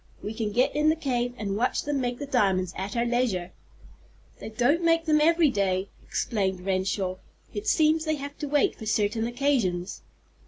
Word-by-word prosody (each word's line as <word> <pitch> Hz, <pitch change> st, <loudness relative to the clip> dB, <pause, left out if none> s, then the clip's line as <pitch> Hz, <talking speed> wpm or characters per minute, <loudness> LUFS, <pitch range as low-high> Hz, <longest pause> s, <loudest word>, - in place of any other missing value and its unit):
We 210 Hz, -, -4 dB
can 220 Hz, -1 st, -2 dB
get 250 Hz, +7 st, +1 dB
in 300 Hz, +1 st, +3 dB
the 315 Hz, -, +3 dB
cave, 245 Hz, -5 st, -2 dB
and 200 Hz, -2 st, -3 dB
watch 240 Hz, +4 st, 0 dB
them 285 Hz, -2 st, -1 dB
make 245 Hz, -1 st, -2 dB
the 285 Hz, -, -5 dB
diamonds 190 Hz, -9 st, +1 dB
at 195 Hz, +4 st, -4 dB
our 235 Hz, -, +2 dB
leisure." 235 Hz, -7 st, 0 dB, 0.9 s
"They -, -, -7 dB
don't 250 Hz, +10 st, +1 dB
make 330 Hz, 0 st, +3 dB
them 305 Hz, -2 st, +3 dB
every 325 Hz, -1 st, +4 dB
day," 195 Hz, -3 st, 0 dB
explained 190 Hz, -4 st, -2 dB
Renshaw. 190 Hz, -1 st, -1 dB, 0.4 s
"It 415 Hz, +1 st, -5 dB
seems 315 Hz, -4 st, +3 dB
they 310 Hz, 0 st, +1 dB
have 285 Hz, 0 st, -7 dB
to 295 Hz, -, -3 dB
wait 290 Hz, 0 st, +2 dB
for 220 Hz, -, -8 dB
certain 220 Hz, +1 st, +1 dB
occasions. 235 Hz, -9 st, -1 dB
240 Hz, 185 wpm, -26 LUFS, 200-290 Hz, 0.9 s, every